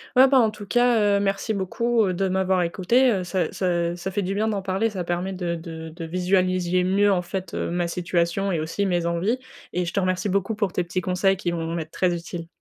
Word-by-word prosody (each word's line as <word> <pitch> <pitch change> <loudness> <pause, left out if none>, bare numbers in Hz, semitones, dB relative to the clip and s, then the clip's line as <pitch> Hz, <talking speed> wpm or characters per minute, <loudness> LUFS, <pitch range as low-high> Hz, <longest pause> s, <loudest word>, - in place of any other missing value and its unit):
Ouais, 260 +1 +8
ben, 270 -1 +5
en 225 -3 +3
tout 210 -1 -10
cas, 225 -3 +3
heu, - - +1
merci 200 +2 -1
beaucoup, 225 +4 +1
heu, 185 - 0
de 195 +2 0
m'avoir 190 0 +1
écoutée, 225 +9 +2
heu, 190 -3 0
ça 180 -2 -1
ça 175 -2 0
ça 180 +2 -5
fait 205 - -1
du 190 0 -2
bien 215 +2 +1
d'en 205 -3 -1
parler. 195 +4 0
Ça 190 -4 -4
permet 175 +2 -2
de 175 -2 -2
de 160 -1 -7
de 165 +1 -7
visualiser 180 +1 +1
mieux, 200 +2 +3
en 180 - +2
fait, 185 +1 -5
heu, - - -2
ma 175 0 0
situation 175 +2 0
et 170 - 0
aussi 165 +6 -2
mes 175 -2 0
envies 175 +9 0 0.3
et 180 0 0
je 175 - -5
te 200 - +1
remercie 185 +2 0
beaucoup 200 +3 0
pour 205 -3 -1
tes 180 - -1
petits 175 +2 -3
conseils 185 +2 +1
qui 175 -2 -2
vont 165 -1 -3
m'être 160 -2 -5
très 180 -2 +1
utiles. 170 0 -6
185 Hz, 245 wpm, -24 LUFS, 175-200 Hz, 0.3 s, Ouais